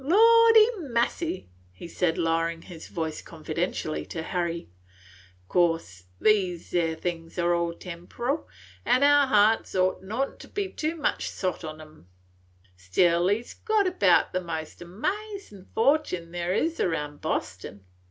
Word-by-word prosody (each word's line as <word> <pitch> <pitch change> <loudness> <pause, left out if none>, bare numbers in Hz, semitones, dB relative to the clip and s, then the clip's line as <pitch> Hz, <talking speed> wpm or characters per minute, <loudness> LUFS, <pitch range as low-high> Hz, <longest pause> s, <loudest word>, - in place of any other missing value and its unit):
Lordy 450 +6 +7
massy," 240 - -1 0.2
he 90 - -10
said 170 -1 0
lowering 165 0 0
his 170 -4 -10
voice 160 -2 -4
confidentially 160 0 -3
to 160 - -5
Harry, 170 -1 -2 0.8
"course 165 - 0
these 185 -5 +1
'ere 165 -2 +1
things 165 0 -5
is - - -17
all 170 -1 +1
temporal, 215 - -4 0.4
an' 255 - +3
our 290 -1 +6
hearts 215 -2 +3
ought 185 0 +1
n't 230 +8 -3
to - - -11
be 400 -2 -3
too 315 -1 -3
much 310 - -1
sot 185 -2 -3
on 155 0 -7
'em; 155 - -15 0.7
still 170 - +2
he 205 +4 +1
's - - -12
got 435 -2 +1
about 280 - +3
the 185 - 0
most 160 -2 -6
amazin' 240 - -5
fortin 225 - +1
there 175 0 -2
is 325 - 0
round 150 -4 -2
Bostin. 100 - -4
180 Hz, 140 wpm, -26 LUFS, 165-265 Hz, 0.8 s, Lordy